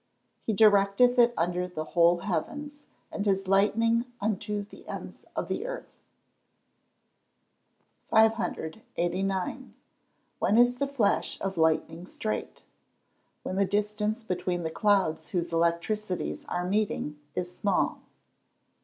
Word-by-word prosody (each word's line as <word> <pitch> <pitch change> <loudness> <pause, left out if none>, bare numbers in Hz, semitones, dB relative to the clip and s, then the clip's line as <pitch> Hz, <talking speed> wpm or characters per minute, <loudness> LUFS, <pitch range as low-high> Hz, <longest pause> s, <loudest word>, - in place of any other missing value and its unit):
[Verse: - - -46
"He 220 - +2
directeth 210 +4 +5
it 240 0 +6
under 180 +2 0
the 165 -3 -5
whole 170 +2 +3
heavens, 290 - -3 0.3
and 205 - -3
his 195 -2 +1
lightning 230 +4 +3
unto 210 0 -2
the 200 - -15
ends - - -8
of - - -2
the - - -3
earth."] - - -8 2.1
589. 195 0 0 0.6
When 215 - +3
is 245 +1 +5
the 280 - 0
flash 245 -8 0
of 195 0 -3
lightning 160 +1 +1
straight? 215 +2 -4 0.8
When 185 - -3
the 200 - +4
distance 210 +3 -1
between 180 -3 -2
the 160 - -2
clouds 195 -5 +1
whose 170 -2 -2
electricities 170 +4 -1
are 175 0 -1
meeting, 190 -6 -1 0.2
is 180 0 -3
small. 200 +1 0
200 Hz, 120 wpm, -28 LUFS, 175-220 Hz, 2.1 s, it